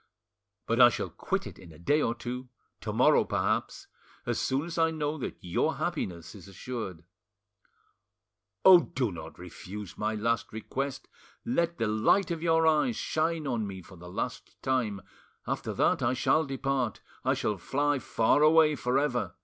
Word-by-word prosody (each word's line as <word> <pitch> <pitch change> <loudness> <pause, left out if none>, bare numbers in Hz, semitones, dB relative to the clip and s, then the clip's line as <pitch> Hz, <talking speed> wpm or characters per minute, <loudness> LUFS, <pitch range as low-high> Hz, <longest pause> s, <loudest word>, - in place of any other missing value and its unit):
But 115 +2 +2
I 120 - +10
shall - - -4
quit - - -2
it - - -9
in 90 -3 -13
a 80 - -14
day 145 - +2
or 115 - 0
two, 125 +1 -6 0.3
to - - -4
morrow - - +4
perhaps—as - - -3
soon 135 +4 0
as 170 0 -4
I 165 0 +4
know 155 -1 -2
that - - -5
your 90 -1 0
happiness 85 -3 -4
is 100 -3 -12
assured. 100 -3 -6 1.6
Oh! 185 -2 +10
do 125 -5 -2
not 85 - -9
refuse 105 0 -9
my 110 +1 -1
last 115 +2 -1
request; 135 +5 -4 0.4
let 170 -8 0
the 115 - 0
light 110 - +2
of 165 -2 -3
your 165 -1 +3
eyes 160 +10 +3
shine 160 0 -1
on 120 -6 -1
me 95 -2 -8
for 95 - -14
the 90 0 -11
last - - -5
time; 115 -7 0 0.4
after - - -3
that - - +2
I 125 +2 +1
shall 155 +5 +2
depart—I 135 -3 -2
shall 105 -3 -2
fly 145 +7 0
far 115 +3 +2
away 155 0 +6
for 125 -1 0
ever. 120 -10 -1
125 Hz, 165 wpm, -29 LUFS, 105-150 Hz, 1.6 s, I